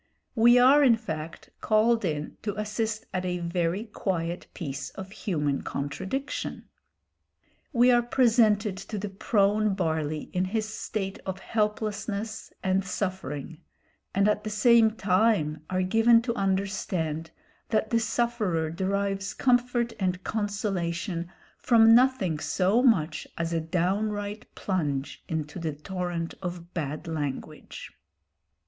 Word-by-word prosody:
We 240 +1 +6
are, 270 +4 +7
in 245 -4 +6
fact, 160 -8 -7
called 225 +1 +3
in 150 -4 -2
to 210 -1 -3
assist 215 +1 -2
at 185 -1 -1
a 180 -1 -1
very 175 +3 -1
quiet 175 -6 -3
piece 140 -4 -5
of 190 0 -9
human 150 -9 -1
contradiction. 190 - -4 1.0
We 250 -2 +5
are 240 -1 +5
presented 225 -5 +3
to 210 - -6
the 205 +1 -3
prone 205 +1 +2
Barley 160 -4 -2
in 185 +1 +1
his 215 +3 -1
state 205 -2 -4
of 190 -1 -4
helplessness 215 0 -2
and 190 +1 +2
suffering, 170 -6 -4 0.6
and 200 +1 +4
at 210 0 +1
the 215 - -3
same 225 +1 +5
time 190 -7 +1
are 185 0 0
given 225 +4 +5
to 235 -1 -1
understand 190 -6 -1 0.4
that 220 -1 0
the 230 - +3
sufferer 220 -8 0
derives 195 +2 -1
comfort 245 -2 +2
and 185 -1 -1
consolation 190 -4 -2 0.3
from 225 -2 +6
nothing 240 - +3
so 195 +8 +2
much 205 - +2
as 170 0 -2
a 165 - +1
downright 205 +5 -1
plunge 145 -8 -2
into 155 0 -4
the 160 -3 -2
torrent 175 +1 -4
of 175 -1 -6
bad 150 -1 -4
language. 145 -4 -5
195 Hz, 125 wpm, -27 LUFS, 170-220 Hz, 1.0 s, are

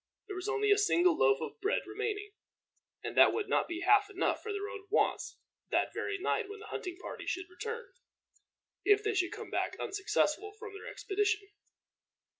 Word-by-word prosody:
There 395 - -6
was 370 +2 -3
only 420 -1 +2
a 410 - +6
single 360 -4 +4
loaf 135 +2 +4
of 160 - -6
bread 410 +5 +1
remaining, 415 0 -3 0.7
and - - -4
that - - +8
would 430 -1 -1
not - - +2
be 345 0 -4
half 415 0 +5
enough 395 -1 0
for 440 - -4
their 405 0 -3
own 400 -1 -8
wants 425 - +1 0.3
that - - +1
very 405 - -2
night 405 +2 0
when 415 - -7
the 430 - -10
hunting 360 -1 -4
party - - -7
should 365 -1 -3
return, 460 +5 -6 0.9
if 410 0 +5
they 430 0 +1
should 370 -3 +1
come - - -7
back - - -1
unsuccessful 395 -1 0
from 440 -2 -8
their 400 - -9
expedition. 415 0 -1
410 Hz, 185 wpm, -32 LUFS, 380-420 Hz, 0.9 s, that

